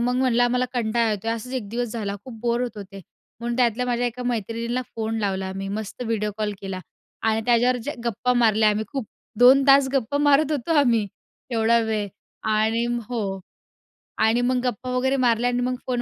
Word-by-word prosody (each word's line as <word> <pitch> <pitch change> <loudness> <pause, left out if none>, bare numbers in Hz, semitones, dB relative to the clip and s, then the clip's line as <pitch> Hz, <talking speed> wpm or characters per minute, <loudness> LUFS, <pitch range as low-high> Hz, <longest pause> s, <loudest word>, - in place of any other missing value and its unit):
मग 245 +1 +1
म्हणलं 250 -2 +2
आम्हाला 250 +1 +2
कंटाळा 230 -1 +1
येतोय. 210 +2 -2
असाच 230 +3 -6
एक 235 -6 -3
दिवस 240 +2 -2
झाला, 205 -4 -3
खूप 235 -4 -10
बोर 235 +1 0
होत 240 -3 -4
होते. 195 -1 -9 0.4
म्हणून 235 +1 -2
त्यातल्या 245 -1 +2
माझ्या 245 0 0
एका 245 +1 -4
मैत्रिणीला 235 +1 -2
फोन 225 0 -2
लावला 190 -2 -2
मी 195 0 -4
मस्त 210 +3 -5
व्हिडिओ 220 -3 -1
कॉल 210 -1 -1
केला 195 -1 -5 0.4
आणि 220 0 +1
त्याच्यावर 245 +1 +3
जे 290 - -2
गप्पा 235 +2 0
मारल्या 220 -3 +4
आम्ही 215 +1 -1
खूप, 265 -6 -3 0.3
2 260 +3 +7
तास 275 -1 +6
गप्पा 270 +1 0
मारत 290 +1 +4
होतो 295 +2 -1
आम्ही 230 -6 +3 0.4
एवढा 230 0 +3
वेळ 215 -2 -1 0.4
आणि 220 +2 +2 0.2
हो. 200 -6 -3 0.8
आणि 225 +2 +3
मग 250 +1 +1
गप्पा 250 +1 -3
वगैरे 265 +2 +1
मारल्या 245 -1 +2
आणि 245 0 0
मग 250 +1 0
फोन 245 -1 0
235 Hz, 185 wpm, -23 LUFS, 220-250 Hz, 0.8 s, 2